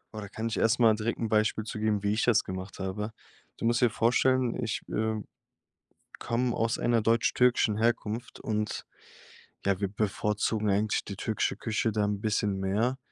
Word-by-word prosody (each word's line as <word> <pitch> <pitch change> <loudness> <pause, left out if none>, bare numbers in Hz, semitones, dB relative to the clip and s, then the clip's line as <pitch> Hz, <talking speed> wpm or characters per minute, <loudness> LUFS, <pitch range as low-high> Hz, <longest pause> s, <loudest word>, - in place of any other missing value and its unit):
Oh, - - -4
da 100 - -8
kann 110 +2 -5
ich 115 - -3
erst 115 +3 +2
mal 115 -2 +6
direkt 115 +2 -2
'n 115 - -1
Beispiel 110 0 +1
zu 110 0 -6
geben, 105 -2 0
wie 100 0 +2
ich 110 - 0
das 120 -4 +4
gemacht 95 +1 -6
habe. 100 +3 -3 0.5
Du - - -4
musst 120 +1 +2
dir 120 - +5
vorstellen, 125 +2 +2
ich, 110 - -2
äh, 110 0 -1 1.0
komme 120 +1 0
aus 115 0 0
einer 120 -1 +2
deutsch-türkischen 115 0 +3
Herkunft 115 0 -1
und 105 -1 -2 0.8
ja, 100 -2 +2
wir 100 - +1
bevorzugen 105 +1 -1
eigentlich 105 +2 +1
die 100 - -6
türkische 110 +3 -1
Küche 110 0 -1
da 105 0 0
'n 105 -1 -1
bisschen 105 -2 0
mehr 105 +7 0
110 Hz, 180 wpm, -29 LUFS, 105-115 Hz, 1.0 s, mal